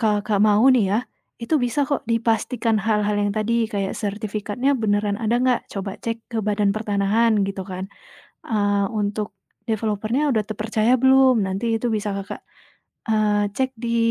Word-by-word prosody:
Kakak, 210 -2 +1
mau 210 +1 +4
nih 235 -5 +3
ya, 210 - +2 0.4
itu 235 +7 -2
bisa 245 +4 0
kok 285 -3 -1
dipastikan 230 0 +1
hal-hal 210 0 +1
yang 205 0 +1
tadi 225 +1 +1
kayak 200 -2 -2
sertifikatnya 215 +5 -2
beneran 205 -3 0
ada 230 +1 +1
enggak, 255 -1 +2
coba 195 -1 -5
cek 230 0 -4
ke 225 - -1
Badan 205 -1 +1
Pertanahan 215 0 +1
gitu 195 -1 -4
kan. 185 0 -6 0.6
Eee, 205 -2 +1
untuk 210 -1 -3 0.3
developer-nya 220 +6 0
udah 220 - +2
tepercaya 220 +3 +1
belum 265 -3 +5
nanti 225 +4 -1
itu 245 - -3
bisa 210 -1 -1
Kakak, 195 0 -6 0.7
eee, 210 -1 +2
cek 260 +2 0
di 235 0 -1
215 Hz, 155 wpm, -22 LUFS, 205-230 Hz, 0.7 s, belum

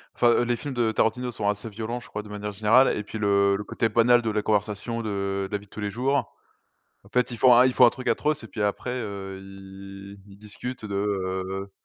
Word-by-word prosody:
enfin 120 0 +4
les 120 0 +1
films 140 +4 -6
de 120 -3 +1
Tarantino 115 +3 0
sont 105 -3 -3
assez 105 +2 -2
violents 110 +3 -4
je 115 - -14
crois 105 0 -6
de 105 - -13
manière 105 0 -5
générale 110 +6 +4
et 105 - -3
puis 110 - -7
le 100 -1 +3
le 100 - -4
côté 115 - -1
banal 120 +2 +4
de 110 - 0
la 105 - 0
conversation 105 +2 -1
de 100 -2 -2
la 105 - 0
vie 100 - -15
de - - -37
tous 110 - -10
les 105 -1 -2
jours. 130 +6 0 0.9
En 100 - -17
fait 125 +1 +1
ils 120 - -6
font 125 0 +7
ils 130 - +3
font 125 - +6
un - - +7
truc 130 +1 -4
atroce 150 0 0
et - - -8
puis 105 - -5
après 105 +4 -1
heu, 100 -3 -6
ils 95 +1 -11
ils 100 -1 -15
discutent 110 +4 -7
de, 100 -2 -5
heu 95 -1 -2
105 Hz, 240 wpm, -25 LUFS, 100-120 Hz, 0.9 s, font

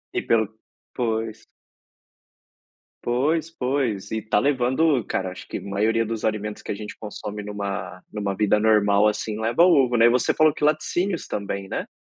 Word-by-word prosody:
E - - +2
pelo 110 -2 +3 0.5
pois. 110 -2 -2 1.6
Pois, 150 +7 +1
pois, 125 - -2
e 110 0 -1
tá 110 -1 +1
levando 130 +1 +2
cara, 95 -1 -2
acho 95 - -10
que - - -4
maioria 110 +3 0
dos 110 0 -3
alimentos 105 -1 -2
que - - -5
a - - -2
gente 105 +1 -8
consome 105 -1 -6
numa 100 -3 -5
numa 100 -2 -2
vida 105 +1 +2
normal, 105 -1 +4
assim, 105 0 -2
leva 115 +9 +3
ovo, 135 -9 +4
né. 115 - +6
E - - +6
você 125 +1 +2
falou 155 -1 +4
que - - -7
laticínios 170 +4 0
também, 100 -1 -4
né. - - -3
110 Hz, 165 wpm, -24 LUFS, 105-130 Hz, 1.6 s, né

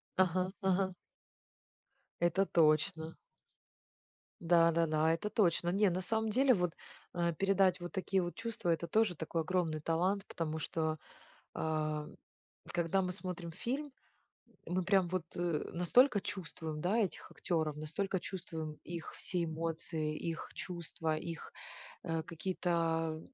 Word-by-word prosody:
Ага 185 0 +2
ага. 190 0 +2 1.3
Это 175 +3 +3
точно. 160 +1 +3 1.2
Да-да-да, 165 -2 +4
это 170 +6 -2
точно. 175 -5 +2
Не, 200 +3 +4
на 180 +1 -1
самом 220 +3 0
деле, 255 +4 +5
вот, 180 -5 +1 0.4
э, 170 -1 +1
передать 195 +1 +3
вот 175 0 -6
такие 190 -1 +1
вот 175 0 -3
чувства- 230 -6 -2
это 170 0 +1
тоже 215 0 +3
такой 165 +1 -2
огромный 165 -2 0
талант, 185 +6 +1
потому 160 -2 -3
что, 160 0 -1 0.5
а, 155 -1 -1 0.7
когда 175 +2 +2
мы 180 -1 -1
смотрим 180 -3 -4
фильм, 265 - -3 0.7
мы 180 +1 0
прям 190 -1 +3
вот, 185 -1 -1
э, - - -2 0.3
настолько 205 +7 +5
чувствуем, 165 -5 -5
да, 195 +6 +2
этих 210 -5 -1
актеров, 155 -4 -1
настолько 170 +5 -1
чувствуем 165 -5 -5
их 170 -2 -6
все 180 -2 +2
эмоции, 160 -1 -2
их 165 0 -4
чувства, 165 -3 -2
их, 165 0 -6 0.5
э, 165 -1 -1
какие-то, 170 +3 -3
а,, 165 -1 +1
175 Hz, 130 wpm, -34 LUFS, 160-190 Hz, 1.3 s, деле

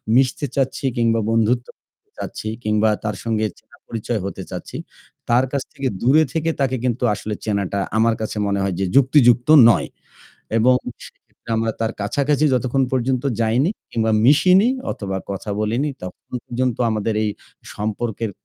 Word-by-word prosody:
মিশতে 130 +2 +2
চাচ্ছি 135 0 -1
কিংবা 115 -1 +2
বন্ধুত্ব 115 +2 +1 0.2
করতে - - -50
চাচ্ছি - - -6 0.2
কিংবা 105 +1 +2
তার 105 -1 -2
সঙ্গে 110 -1 0
চেনা - - -22
পরিচয় 115 0 -3
হতে 100 - -5
চাচ্ছি, - - -6 0.5
তার 120 +2 +4
কাছ 140 -2 -1
থেকে 135 -1 -3
দূরে 140 +6 +5
থেকে 165 0 0
তাকে 130 -1 +1
কিন্তু 125 0 -1
আসলে 105 +1 -5
চেনাটা 100 -2 -1 0.2
আমার 115 +1 +3
কাছে 110 0 -4
মনে 100 0 0
হয় 95 - -1
যে 95 - +1
যুক্তিযুক্ত 130 -3 +5 0.2
নয় 115 - +2 0.7
এবং 125 +3 +5 0.3
সেক্ষেত্রে - - -15
আমরা 115 0 0
তার 115 0 0
কাছাকাছি 140 +8 +1
যতক্ষণ 130 +2 +1
পর্যন্ত 130 0 0 0.2
যাইনি 120 - +2 0.2
কিংবা 110 -1 0 0.2
মিশিনি 185 - +5 0.2
অথবা 95 -2 -4
কথা 100 +2 -5
বলিনি, 120 +8 0
ততক্ষণ 90 +6 -8
পর্যন্ত 125 0 -1
আমাদের 110 0 -1
এই 105 - 0 0.4
সম্পর্কের 110 +1 -3
115 Hz, 155 wpm, -21 LUFS, 110-130 Hz, 0.7 s, দূরে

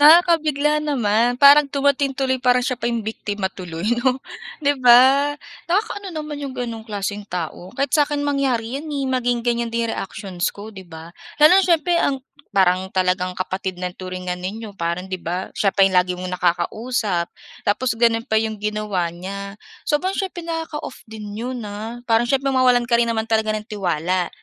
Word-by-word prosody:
Nakakabigla 300 -2 +5
naman. 245 -4 +1
Parang 285 +1 +7
dumating 280 -1 +1
tuloy, 260 -2 0
parang 250 -1 +3
siya 255 -1 -1
pa 235 - 0
'yong 235 -2 -2
biktima 205 -3 -3
tuloy, 175 -2 -7 0.2
'no, 255 0 +2 0.5
'di 285 - +5
ba. 265 +4 +6 0.3
Nakakaano 405 +1 -1
naman 300 -2 -5
'yong 275 -2 -5
gano'n 230 -3 -4
klaseng 205 0 -3
tao, 175 +1 -5
kahit 275 0 -1
sa'kin 290 -1 +2
mangyari 265 -4 0
'yan, 315 - -9
eh, 285 -2 -2
maging 245 -2 0
ganiyan 235 -1 0
din 230 0 -1
reactions 190 -3 -3
ko, 210 +2 -9
'di 190 -3 -11
ba. 160 0 -10 0.2
Lalo 315 +6 +7
na - - 0
siyempre 340 0 +2
ang 270 -1 0 0.3
parang 190 -1 +3
talagang 180 0 +1
kapatid 185 0 -4
na 180 - -1
ang - - -34
turingan 185 -1 -5
ninyo, 210 +4 -6
parang, 170 +1 -2
'di 185 -1 -4
ba, 180 +3 -4
siya 200 - +1
pa 195 - +5
'yong 190 -1 +1
lagi 180 0 +2
mong 180 0 -5
nakakausap 180 +2 0 0.4
tapos 245 +5 +1
gano'n 230 0 +2
pa 220 -4 +2
'yong 220 -1 -2
ginawa 210 -4 -2
niya. 200 +3 -7 0.2
Sobrang 365 +6 0
siyempre, 365 -3 -4
nakaka-off 325 -5 -5
din 215 -2 -8
'yon, 245 +2 -4
ah. 220 +4 -6
Parang 230 +1 +4
siyempre 275 +2 +1
mawalan 250 -2 +3
ka 235 - +4
rin 235 0 +2
naman 220 -1 0
talaga 220 -1 +1
ng 215 0 -5
tiwala. 180 -3 -1
230 Hz, 180 wpm, -21 LUFS, 190-275 Hz, 0.5 s, Parang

